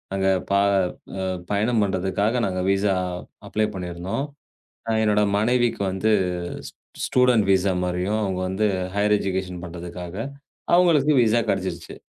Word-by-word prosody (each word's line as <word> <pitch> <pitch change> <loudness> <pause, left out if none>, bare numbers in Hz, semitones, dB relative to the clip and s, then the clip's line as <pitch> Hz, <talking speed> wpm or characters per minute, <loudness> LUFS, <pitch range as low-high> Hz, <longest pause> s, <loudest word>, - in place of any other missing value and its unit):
அங்க 95 0 +1 0.2
ப - - 0 0.7
அ 95 - -1 0.2
பயணம் 110 +3 +2
பண்றதுக்காக 100 +4 0
நாங்க 95 -1 -2
விசா 100 0 +2 0.5
அப்ளை 110 0 +1
பண்ணிருந்தோம். 90 +7 -3 0.6
அ - - +1
என்னோட 105 -1 +3 0.2
மனைவிக்கு 120 +2 +1
வந்து 95 +4 0 0.6
ஸ் - - -13 0.3
ஸ்டூடண்ட் 125 -4 +3
விசா 95 0 +2
மாரியும் 90 +4 -1
அவங்க 95 -2 -1
வந்து 95 +3 0 0.3
ஹையர் 105 +1 +3
எஜுகேஷன் 95 -2 -3
பண்றதுக்காக 90 +1 -7 0.6
அவங்களுக்கு 160 -5 +4
விசா 115 +1 +3
கிடைச்சுருச்சு. 90 -3 -3
100 Hz, 125 wpm, -23 LUFS, 95-110 Hz, 0.7 s, அவங்களுக்கு